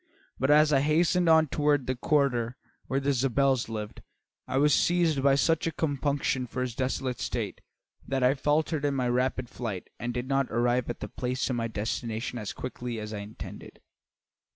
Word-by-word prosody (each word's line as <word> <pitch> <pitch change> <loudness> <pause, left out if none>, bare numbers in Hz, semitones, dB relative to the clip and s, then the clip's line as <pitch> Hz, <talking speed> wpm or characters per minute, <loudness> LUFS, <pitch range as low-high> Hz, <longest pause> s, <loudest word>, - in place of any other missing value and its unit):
But 130 - +1
as 150 0 +6
I 135 - +5
hastened 165 +4 +3
on 160 0 +6
toward 145 -2 +1
the 130 - 0
quarter 125 -3 +1 0.3
where 135 - 0
the 140 +1 +1
Zabels 135 -1 +1
lived, 105 -1 -6 0.5
I 130 - -1
was 145 +1 +4
seized 170 -4 +2
by 140 0 +4
such 165 +3 +2
compunction 140 -3 0
for 125 +2 -3
his 125 -2 -3
desolate 130 0 -2
state - - -3 0.5
that 135 -1 0
I 125 +1 +5
faltered 150 +2 0
in 145 -1 +1
my 130 -2 0
rapid 125 +1 0
flight 110 -6 -5
and 120 0 -2
did 125 +1 -4
not 135 -1 +1
arrive 120 +1 +1
at 120 - -5
the - - -3
place 125 +1 -2
of - - 0
my 115 -1 -1
destination 115 +2 -3
as 105 - -4
quickly 125 -2 -5
as 105 0 -6
I 105 - -4
intended. 100 +2 -9
130 Hz, 180 wpm, -28 LUFS, 120-145 Hz, 0.5 s, as